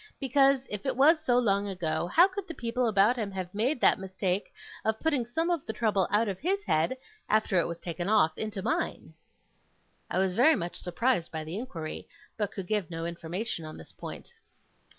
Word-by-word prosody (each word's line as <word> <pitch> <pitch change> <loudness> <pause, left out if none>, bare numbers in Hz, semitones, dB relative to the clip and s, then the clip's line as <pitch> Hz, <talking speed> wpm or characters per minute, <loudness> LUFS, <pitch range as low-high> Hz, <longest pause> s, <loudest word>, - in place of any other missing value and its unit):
Because, 270 0 +3
if 210 -1 -3
it 260 -2 0
was 310 +4 +6
so 250 -6 +2
long 205 -4 +2
ago, 170 -4 -2
how 345 - +6
could 390 0 -6
the 330 - -7
people 240 +1 -1
about 215 +3 +4
him 215 -4 -2
have 185 -2 -5
made 245 +7 +1
that - - +5
mistake 190 0 -2 0.3
of 220 0 0
putting 285 -7 0
some 325 +8 0
of 335 -5 0
the 220 - -3
trouble 210 -5 +1
out 220 +2 +2
of 195 -2 -3
his 390 +6 0
head, 165 - +1 0.3
after 215 -4 +3
it - - +1
was 170 0 -5
taken 175 +2 -4
off, 210 -7 +4
into 210 -3 -4
mine?' 320 +10 -2 1.0
I - - -2
was 190 -1 +2
very 260 - +5
much 175 -3 -4
surprised 180 0 0
by 160 -1 -4
the 160 +3 -6
inquiry; 165 -11 -6 0.3
but 205 -2 -2
could 195 - -6
give 205 -3 -1
no 165 -1 -4
information 170 +3 -4
on 155 0 -8
this 80 - -11
point. - - -9
210 Hz, 200 wpm, -29 LUFS, 180-255 Hz, 1.0 s, was